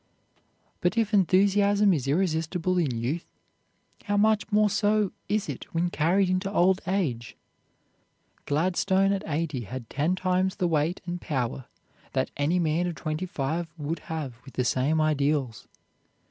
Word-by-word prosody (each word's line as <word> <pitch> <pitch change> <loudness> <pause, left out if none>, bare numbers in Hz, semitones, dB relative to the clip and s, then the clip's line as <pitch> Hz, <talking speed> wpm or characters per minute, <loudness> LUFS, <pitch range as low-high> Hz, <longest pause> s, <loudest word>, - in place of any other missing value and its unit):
But 180 +4 0
if 220 -2 +1
enthusiasm 200 +1 +4
is 135 -5 -2
irresistible 175 +2 0
in 160 -5 +1
youth, 135 +9 -3 0.8
how 205 -2 0
much 215 +1 +2
more 210 0 +4
so 210 -1 +2 0.2
is 210 0 0
it 140 -5 -7
when 175 +1 +1
carried 180 +5 +2
into 185 +2 -1
old 190 -1 +3
age! 145 - -2 1.1
Gladstone 190 +5 +2
at 195 - -2
eighty 150 -3 -2
had 120 +1 -8
ten 155 +6 +1
times 185 0 0
the 180 -4 0
weight 160 +2 0
and 175 -1 -4
power 130 -3 -2 0.5
that - - 0
any 145 +5 +1
man 170 +1 +1
of 175 - -4
twenty 155 +3 -3
five 165 0 -2
would 155 +2 -3
have 150 -7 -4
with 135 - -14
the 125 - 0
same 135 +6 +1
ideals. 145 -6 0
175 Hz, 145 wpm, -27 LUFS, 150-190 Hz, 1.1 s, enthusiasm